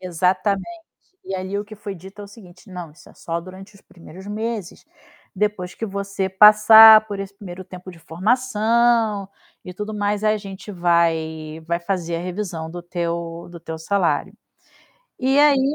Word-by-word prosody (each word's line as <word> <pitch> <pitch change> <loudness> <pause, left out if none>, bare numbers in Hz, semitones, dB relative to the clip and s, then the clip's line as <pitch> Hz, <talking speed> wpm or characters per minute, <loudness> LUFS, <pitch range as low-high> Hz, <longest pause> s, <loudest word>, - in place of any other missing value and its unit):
Exatamente, 190 - -1 0.4
e 195 - -5
ali 190 +2 -3
o 205 - -4
que 215 - -12
foi 205 -1 -7
dito 190 +4 -13
é - - -7
o - - -11
seguinte: 190 -2 -16
"Não, 180 -3 -8
isso 150 - -18
é - - -19
só 170 0 -4
durante 190 +3 -12
os 200 - -18
primeiros 180 +2 -14
meses, 215 -2 -5 0.5
depois 195 -3 -2
que 225 - -5
você 200 -1 -3
passar 215 +2 +8
por 205 -2 -6
esse 195 0 -7
1° 190 -3 -10
tempo 185 0 -11
de 175 - -15
formação, 225 +2 +1 0.4
e 180 - -8
tudo 210 +3 -5
mais, 205 0 -1
a 215 0 +3
gente 200 0 -9
vai 160 -3 0
vai 170 +1 -1
fazer 170 -2 -3
a 165 - -4
revisão 175 -3 -5
do 175 0 -8
teu 170 -1 -4
do 170 - -10
teu 160 -1 -7
salário". 180 +2 -1 0.8
E 265 +2 +2
aí 285 -1 +4
195 Hz, 170 wpm, -21 LUFS, 175-210 Hz, 0.8 s, passar